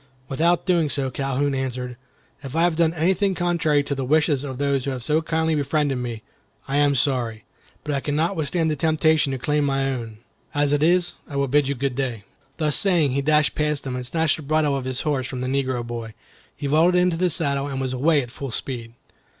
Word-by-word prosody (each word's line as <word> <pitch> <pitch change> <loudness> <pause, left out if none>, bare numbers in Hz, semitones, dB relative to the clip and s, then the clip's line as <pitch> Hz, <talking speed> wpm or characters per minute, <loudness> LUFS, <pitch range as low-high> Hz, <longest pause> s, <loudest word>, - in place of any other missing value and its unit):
Without 165 +5 +1
doing 170 -5 +2
so, 135 -1 -1
Calhoun 135 +1 -1
answered, 125 -2 -3 0.5
"If 135 0 -8
I 165 - +3
have 175 -2 +2
done 165 -1 +3
anything 190 +4 +1
contrary 165 -5 +1
to 140 - -3
the 135 -1 -3
wishes 150 0 +2
of 135 -3 -5
those 140 -1 0
who - - -1
have 130 -3 -4
so 155 +5 +1
kindly 160 0 0
befriended 145 -2 0
me, 120 -3 -5 0.4
I 135 +1 0
am 145 -1 +3
sorry; 120 -5 0 0.4
but 150 - -2
I 140 - +1
could 145 +1 -2
not 165 +5 +1
withstand 160 +1 0
the - - 0
temptation 155 0 +2
to 135 - -2
claim 150 +4 0
my 135 -1 0
own. 115 -4 -5 0.4
As 145 0 +2
it 145 - +2
is, 175 +2 +3 0.2
I 140 - -7
will 140 0 +1
bid 145 +1 +3
you 140 - -1
good 135 +1 -1
day." 125 -5 -3 0.3
Thus 150 -3 +2
saying, 170 -8 +3
he 140 +2 0
dashed 150 +1 +3
past 150 -2 -1
them, 130 -2 -4
and 125 - -4
snatching 160 +4 0
the - - -13
bridle 155 -2 +2
of 135 -2 -3
his 130 0 -2
horse 140 -4 -1
from 130 -2 -5
the 130 - -2
negro 130 -2 -1
boy, 115 -2 -6 0.4
he - - -6
vaulted 165 +5 +4
into 180 -2 +2
the 180 +1 +2
saddle 140 -3 -1
and 135 -2 -4
was 130 -1 -2
away 145 +2 +2
at 120 - -10
full 140 +1 -6
speed. 115 -2 -5
140 Hz, 225 wpm, -23 LUFS, 130-155 Hz, 0.5 s, vaulted